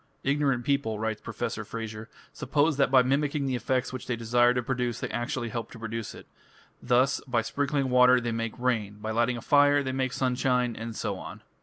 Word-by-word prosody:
"Ignorant 140 Hz, -3 st, +1 dB
people", 140 Hz, -6 st, 0 dB
writes 110 Hz, 0 st, -3 dB
Professor -, -, -4 dB
Frazer, 110 Hz, -1 st, -7 dB, 0.2 s
"suppose 150 Hz, 0 st, +1 dB
that 140 Hz, -2 st, +3 dB
by 130 Hz, -1 st, +6 dB
mimicking 140 Hz, +2 st, 0 dB
the 130 Hz, -1 st, -1 dB
effect 130 Hz, +1 st, -1 dB
which 130 Hz, -, -6 dB
they 125 Hz, -, 0 dB
desire 120 Hz, +1 st, +3 dB
to 125 Hz, 0 st, -1 dB
produce 125 Hz, -2 st, -2 dB
they -, -, -4 dB
actually 120 Hz, 0 st, -3 dB
help 115 Hz, -1 st, -5 dB
to -, -, -10 dB
produce 115 Hz, 0 st, -5 dB
it: -, -, -12 dB, 0.6 s
thus 125 Hz, +2 st, +2 dB
by 120 Hz, -3 st, +1 dB
sprinkling 140 Hz, +1 st, -1 dB
water 125 Hz, 0 st, +6 dB
they 120 Hz, -1 st, -3 dB
make 115 Hz, 0 st, -3 dB
rain, 115 Hz, -5 st, -1 dB
by 110 Hz, +1 st, -4 dB
lighting 120 Hz, +2 st, +1 dB
a -, -, -7 dB
fire 145 Hz, 0 st, +4 dB
they 130 Hz, -, -2 dB
make 130 Hz, -1 st, -1 dB
sunshine, 125 Hz, -2 st, 0 dB
and 115 Hz, 0 st, -6 dB
so -, -, -3 dB
on." -, -, -9 dB
125 Hz, 200 wpm, -27 LUFS, 115-135 Hz, 0.6 s, by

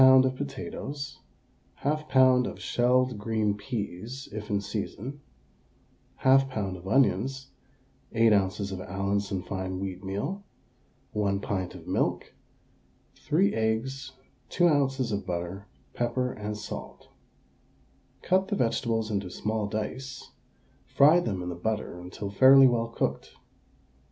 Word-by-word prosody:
of 130 Hz, 0 st, +7 dB
potatoes, 140 Hz, 0 st, -6 dB, 0.6 s
1/2 150 Hz, +1 st, -1 dB
lb. 130 Hz, -1 st, +5 dB
of 100 Hz, -, -10 dB
shelled 125 Hz, +4 st, +2 dB
green 105 Hz, -1 st, 0 dB
peas 110 Hz, +3 st, -5 dB
(if 105 Hz, 0 st, -6 dB
in 100 Hz, -1 st, +1 dB
season), 110 Hz, +7 st, -5 dB, 1.0 s
1/2 135 Hz, 0 st, +5 dB
lb. 100 Hz, -7 st, -3 dB
of 90 Hz, +1 st, -10 dB
onions, 130 Hz, +3 st, +1 dB, 0.6 s
8 115 Hz, -1 st, +4 dB
oz. 100 Hz, 0 st, +1 dB
of 95 Hz, -1 st, -5 dB
Allinson 100 Hz, 0 st, -2 dB
fine 95 Hz, -1 st, -4 dB
wheatmeal, 100 Hz, -, -4 dB, 0.7 s
1 100 Hz, -2 st, 0 dB
pint 95 Hz, -3 st, -3 dB
of -, -, -11 dB
milk, -, -, -1 dB, 0.8 s
3 170 Hz, +7 st, +1 dB
eggs, 110 Hz, +6 st, -1 dB, 0.4 s
2 175 Hz, -1 st, +3 dB
oz. 135 Hz, -5 st, +1 dB
of 100 Hz, -1 st, -3 dB
butter, 90 Hz, +3 st, -4 dB, 0.3 s
pepper 125 Hz, +1 st, -1 dB
and 105 Hz, 0 st, -5 dB
salt. 65 Hz, -, -8 dB, 1.1 s
Cut 190 Hz, +1 st, +2 dB
the 205 Hz, -, -1 dB
vegetables 115 Hz, -, 0 dB
into 100 Hz, -3 st, -2 dB
small 105 Hz, +3 st, -2 dB
dice; 130 Hz, +6 st, -5 dB, 0.6 s
fry 150 Hz, +5 st, +6 dB
them 100 Hz, -, -2 dB
in 90 Hz, -, -4 dB
the -, -, -3 dB
butter 105 Hz, -1 st, -3 dB
until 95 Hz, +3 st, -6 dB
fairly 135 Hz, +5 st, +8 dB
well 115 Hz, -2 st, +1 dB
cooked. 115 Hz, -, -3 dB
110 Hz, 120 wpm, -28 LUFS, 100-130 Hz, 1.1 s, fairly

